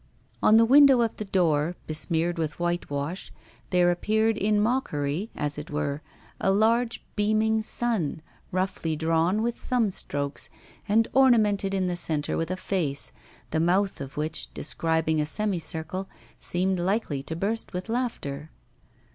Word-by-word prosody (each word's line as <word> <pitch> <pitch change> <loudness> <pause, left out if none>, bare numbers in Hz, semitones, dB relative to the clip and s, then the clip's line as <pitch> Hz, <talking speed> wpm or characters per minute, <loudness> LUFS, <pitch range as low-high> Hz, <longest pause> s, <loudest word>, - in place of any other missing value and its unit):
On 220 - +6
the 230 - +6
window 270 0 +7
of 230 -2 -1
the 215 - -4
door, 170 -4 +1
besmeared 165 +2 0
with 155 0 -3
whitewash, 175 -1 -3 0.4
there 175 -1 +4
appeared 220 +5 +1
in 210 0 +1
mockery, 205 - -1
as 150 0 -2
it 150 - -8
were, 145 -1 -2 0.4
a - - +1
large 230 +4 +2
beaming 215 +1 +2
sun, 215 -9 -1 0.3
roughly 185 -3 -1
drawn 165 +6 +1
with 235 0 0
thumb 235 -4 0
strokes, 140 -5 -2 0.4
and 225 +2 +4
ornamented 210 -7 +4
in 190 -1 0
the 180 -1 -1
centre 155 -4 0
with 165 0 -2
a 185 - -2
face, 160 -8 -1 0.4
the 160 - +1
mouth 185 +2 +1
of 135 0 -8
which, 155 +1 -3
describing 160 0 0
a - - 0
semicircle, 185 -1 -2 0.3
seemed 185 +1 -1
likely 180 -6 -1
to 160 +4 -6
burst 210 +6 -2
with 180 +2 -5
laughter. 190 - -3
180 Hz, 145 wpm, -26 LUFS, 160-215 Hz, 0.4 s, window